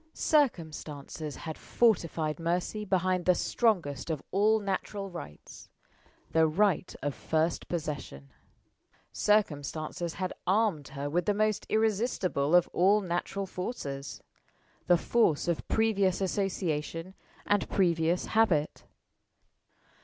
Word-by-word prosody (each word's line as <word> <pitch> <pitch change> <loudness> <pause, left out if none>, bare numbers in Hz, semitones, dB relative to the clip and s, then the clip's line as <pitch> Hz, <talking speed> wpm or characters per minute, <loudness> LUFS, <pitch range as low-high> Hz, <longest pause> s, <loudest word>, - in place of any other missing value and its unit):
Circumstances 155 - -1
had 160 -2 -7
fortified 165 -8 +1
Mercy 175 +5 -1
behind 185 -2 +1
the 180 - +5
strongest 175 - 0
of 155 -4 -2
all 215 +3 +3
natural 195 0 -3
rights 75 - -10 0.6
the 160 0 +4
right 185 +2 +1
of 145 -1 -1
first 160 +4 -1
possession. 145 - -5 0.8
Circumstances 165 -4 0
had 185 -1 -3
armed 190 -7 +2
her 140 +1 -5
with 175 +6 -1
the 205 - +2
most 215 0 0
irresistible 205 - +1
of 180 - +5
all 200 +4 +4
natural 190 +2 -2
forces 145 - -5 0.6
the 175 - +6
force 170 -6 +2
of 170 -2 -1
previous 200 -4 +2
association 180 -3 -2 0.3
and 205 -1 +1
previous 170 -2 +1
habit. 180 -10 +2
180 Hz, 110 wpm, -29 LUFS, 155-205 Hz, 0.8 s, the